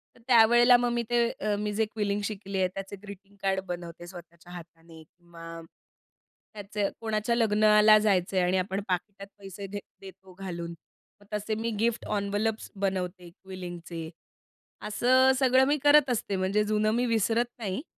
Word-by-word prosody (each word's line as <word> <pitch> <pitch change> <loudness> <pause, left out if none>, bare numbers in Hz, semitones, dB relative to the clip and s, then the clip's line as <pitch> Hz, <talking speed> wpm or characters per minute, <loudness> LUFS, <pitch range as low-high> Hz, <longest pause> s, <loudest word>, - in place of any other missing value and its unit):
तर - - -20
त्यावेळेला 240 +1 +6
मग 245 0 0
मी 235 0 -1
ते 240 -1 +2
अ, 210 -2 -2
मी 210 0 -2
जे 220 +1 +1
क्विलिंग 205 -1 -2
शिकली 200 -2 -5
आहे 185 - +3
त्याचे 195 +1 -7
ग्रीटिंग 200 0 -12
कार्ड 190 -1 +1
बनवते 175 -1 -7
स्वतःच्या 175 -1 -13
हाताने 165 -1 -13
किंवा 165 0 -12 0.9
त्याचे 205 -1 -3
कोणाच्या 220 +1 -1
लग्नाला 215 -1 +5
जायचं 195 -3 +1
आहे 180 - +3
आणि 185 +1 +1
आपण 190 +2 -2
पाकिटात 195 +2 -4
पैसे 195 0 -8
दे 205 +1 -5 0.2
देतो 190 -1 -13
घालून 170 -3 -5 0.5
मग - - -19
तसे 210 +1 -2
मी 225 +2 -2
गिफ्ट 230 +1 0
एन्व्हलप्स 205 +2 -2 0.2
बनवते 180 -2 -3
क्विलिंगचे 175 -3 -8 0.8
असं 255 +5 +4
सगळं 260 0 +4
मी 290 +2 +2
करत 290 -2 +5
असते 205 -4 -1
म्हणजे 195 +3 +1
जुनं 215 0 +1
मी 245 +1 +1
विसरत 230 +1 +1
नाही. 205 +3 -4
205 Hz, 155 wpm, -27 LUFS, 185-220 Hz, 0.9 s, त्यावेळेला